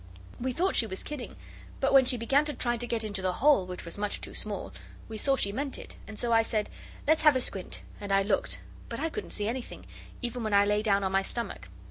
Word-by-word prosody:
We 260 +1 -1
thought 365 +9 +1
she 225 - +3
was 190 -2 -5
kidding, 295 -5 -6 0.4
but 270 - +2
when 270 -1 +8
she 250 0 +2
began 270 +6 +3
to 295 -2 -3
try 240 0 +1
to 240 +1 -3
get 230 -1 -1
into 200 -3 -3
the 185 -1 +1
hole, 275 -6 +4
which 180 -1 -6
was 170 +4 -5
much 205 0 -1
too - - -7
small, - - -4 0.3
we 225 - -7
saw 270 +5 +2
she 200 -6 +2
meant 275 +5 -2
it, - - -9 0.2
so 235 +2 0
I 225 - +7
said, 215 -2 -1 0.4
'Let's 315 +1 +4
have 300 -3 +7
a - - +3
squint,' 195 -6 -3 0.2
and 205 -1 -5
I 195 0 +5
looked, 200 0 0 0.3
but - - -4
I 325 - 0
couldn't 425 - -5
see 205 - -1
anything, 245 +2 -5 0.4
even 245 0 -2
when 215 -2 +1
I 200 0 +6
lay 210 +1 +2
down 200 -2 +2
on 190 - 0
my 195 0 +3
stomach. 235 +4 -4
230 Hz, 245 wpm, -29 LUFS, 200-260 Hz, 0.4 s, when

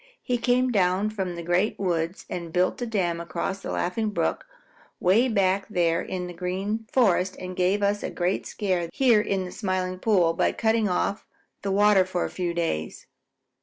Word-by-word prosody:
He 245 -1 -1
came 250 +1 +2
down 195 0 +2
from 190 -4 -3
the 170 - -6
Great 175 +5 +1
Woods 175 -1 -2
and 170 -2 -5
built 180 +7 +1
a 245 - -2
dam 175 -6 -1
across 170 +3 -3
the - - -7
Laughing 215 +5 -1
Brook - - -1 0.5
way 210 +8 +4
back 195 -3 +1
there 170 -3 +1
in 180 -1 -4
the 180 - -7
Green 190 +5 -3
Forest 190 -7 +2
and 185 0 -6
gave 190 +3 +1
us 205 +1 +1
a - - -3
great 180 +2 -1
scare 185 -5 -1
here 240 -3 +4
in 195 -2 -1
the 180 - -7
Smiling 185 -2 -2
Pool 185 -6 +3
by - - +1
cutting 220 -2 +1
off 190 +2 -1 0.3
the 200 - -3
water 205 -1 +5
for 185 -1 -2
a - - -5
few 180 -2 -2
days. 165 - -3
185 Hz, 185 wpm, -25 LUFS, 180-210 Hz, 0.5 s, water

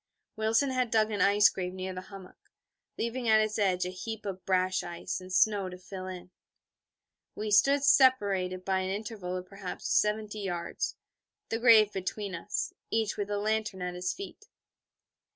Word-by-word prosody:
Wilson 225 +5 +2
had 255 -2 0
dug 220 0 +2
an 205 -3 -1
ice 205 +2 +6
grave 180 -1 -3
near 185 0 -4
the 185 - -6
hummock, 195 -2 -13 0.5
leaving 235 +1 -2
at 220 0 +6
its 215 0 0
edge 185 -3 +2
a 180 - -3
heap 220 +4 -6
of 190 -2 -5
brash 185 0 +2
ice 175 +1 -5
and 185 0 -10
snow 200 0 +3
to 180 - -9
fill 185 0 -8
it. 180 -1 -8 1.0
We 210 0 -4
stood 275 +7 +5
separated 200 -10 +3
by 190 -1 +1
an 185 0 -2
interval 200 -3 -4
of 180 - -6
perhaps 195 -1 -7
seventy 210 0 +1
yards, 175 -4 -3 0.5
the 225 - -1
grave 220 -3 +6
between 195 +1 -4
us, 170 +5 -3 0.2
each 220 -2 0
with 205 -1 -3
a 205 - -1
lantern 210 -2 -1
at 180 0 -3
his 180 0 -2
feet. 400 +3 -9
200 Hz, 170 wpm, -29 LUFS, 185-220 Hz, 1.0 s, ice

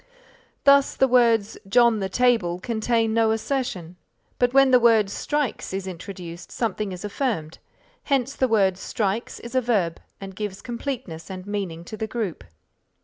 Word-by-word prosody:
Thus, 280 -1 +5
the 265 - +3
words 230 -4 +3
John 235 0 +4
the 190 -1 -2
table, 225 -6 +2
contain 225 +1 0
no 225 -1 +3
assertion, 220 - -2 0.4
but 245 -1 +3
when 270 0 +5
the 250 - +7
word 225 -4 +4
strikes 290 -9 -2
is 195 -1 -3
introduced, 175 -1 -8
something 215 -3 -2
is 185 +2 -6
affirmed, 205 - -3 0.5
hence 275 -1 0
the 260 - +2
word 195 -5 +2
strikes 210 +3 -2
is 235 - -9
a 260 - +3
verb 200 -9 0 0.2
and 195 -1 -8
gives 205 -1 -5
completeness 235 - -5
and 185 -1 -7
meaning 190 -5 -4
to 215 - -8
the 220 - -3
group. 210 - -4
220 Hz, 155 wpm, -24 LUFS, 190-245 Hz, 0.5 s, the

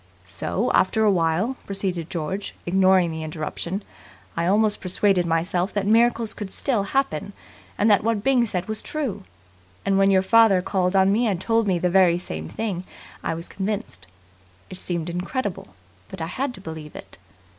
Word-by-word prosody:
"So - - -2
after 220 - +3
a 210 - +5
while," 180 +8 +1
proceeded 185 -4 -3
George, 185 +4 -4
ignoring 185 -1 +4
the 160 0 -5
interruption, 160 +5 -4 0.5
"I 170 0 0
almost 210 +2 +2
persuaded 185 -1 +1
myself 175 +3 0
that 205 -1 -1
miracles 230 +1 +3
could 200 -3 -7
still 245 -7 0
happen, 200 - -1 0.4
and 210 - +2
that 205 - +4
what 220 -2 0
Byng 255 -2 +3
said 180 -3 -3
was 215 0 -3
true. 280 - -4 0.6
And 195 0 +2
when 195 0 +5
your 190 -1 +4
father 205 -3 +5
called 185 -1 0
on 190 0 +5
me 230 +4 +2
and 195 -5 0
told 225 +2 +1
me 185 -2 +2
the 180 +1 0
very 180 -2 +5
same 80 - -6
thing 200 -5 -3 0.4
I - - -1
was 165 +2 -7
convinced. 205 - -4 0.6
It 185 - -8
seemed 170 -2 -3
incredible, 180 - -4 0.3
but - - -8
I 160 - -2
had 255 +9 -3
to - - -12
believe 160 -3 -8
it. - - -10
190 Hz, 175 wpm, -23 LUFS, 175-215 Hz, 0.6 s, a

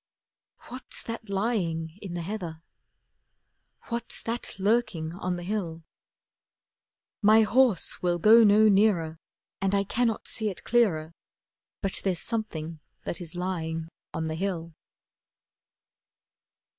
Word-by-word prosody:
What's 255 +1 -2
that 230 -2 -6
lying 190 -5 -1
in 185 -4 -6
the 170 - -3
heather? 170 -4 -5 1.3
What's 235 0 -3
that 230 -2 -4
lurking 195 -6 0
on 180 -1 -3
the 175 - -6
hill? 175 -4 -3 1.4
My 215 +1 +6
horse 230 -3 +3
will 175 -1 +1
go 220 +6 +7
no 215 +1 +6
nearer, 195 -6 +3 0.4
And 195 0 +1
I 200 - +2
cannot 225 +2 -1
see 220 -1 +1
it 190 - -8
clearer, 170 -10 +2 0.7
But 195 -1 +1
there's 190 -3 +1
something 165 -8 -3 0.2
that 175 - -4
is 170 -1 -6
lying 165 -3 -3 0.2
on 160 -1 -3
the 160 - -2
hill. 170 -2 -3
190 Hz, 120 wpm, -27 LUFS, 165-220 Hz, 1.4 s, go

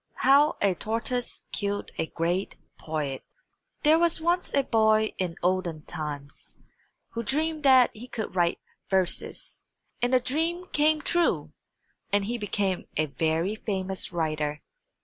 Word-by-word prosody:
HOW 280 +3 +6
A 200 -2 +4
TORTOISE 230 +5 -2
KILLED 205 0 -2
A 160 - 0
GREAT 175 +4 -1 0.2
POET 150 -4 -3 0.6
There 310 +2 +6
was 340 -1 +3
once 345 +2 0
a 280 - +3
boy 220 -2 +3
in 180 -3 -1
olden 175 -4 0
times 145 -2 -6 0.5
who 230 - -4
dreamed 310 +6 0
that 260 -2 +7
he 235 +4 -10
could 220 -6 -5
write 175 -2 +2 0.3
verses, 190 -2 -1 0.4
and 245 +1 +2
the 255 - +5
dream 325 +8 -1
came 305 0 +3
true, 345 0 +1 0.6
and 205 -1 +2
he 235 +3 -2
became 200 -3 -1
a 155 - +3
very 160 +6 0
famous 190 -3 -2
writer. 155 -3 -2
205 Hz, 135 wpm, -27 LUFS, 170-265 Hz, 0.6 s, that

